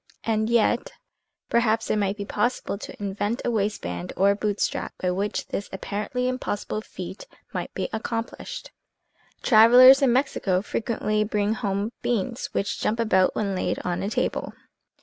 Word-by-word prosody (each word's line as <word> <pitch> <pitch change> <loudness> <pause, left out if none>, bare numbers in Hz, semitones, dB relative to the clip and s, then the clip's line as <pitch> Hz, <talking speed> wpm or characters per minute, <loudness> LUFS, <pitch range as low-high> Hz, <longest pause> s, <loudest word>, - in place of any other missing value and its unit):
And 220 -1 0
yet, 235 +1 +2 0.6
perhaps, 225 -1 +1
it - - +2
might 200 0 0
be 200 - -4
possible 210 +1 -1
to 200 - -9
invent 205 +4 -2
a 240 - +1
waist 210 -2 -1
band 85 +1 -4
or 200 +1 +5
a - - +1
boot 205 0 -2
strap - - -2
by 180 - 0
which 200 +3 -2
this 200 - -4
apparently 210 +6 -3
impossible 215 -4 -3
feat - - -8 0.3
might - - -3
be - - -1
accomplished! 230 +1 -4 0.7
Travelers 250 +4 +8
in 270 -3 +4
Mexico 215 -8 +1
frequently 215 -2 -1
bring 210 0 0
home 205 -2 -2
beans 240 +1 -1
which 200 - -2
jump 225 +2 0
about 190 -5 +3
when 200 -2 -1
laid 185 - -1
on 175 -1 -1
a 195 - -1
table. - - -2
215 Hz, 160 wpm, -25 LUFS, 200-235 Hz, 0.7 s, Travelers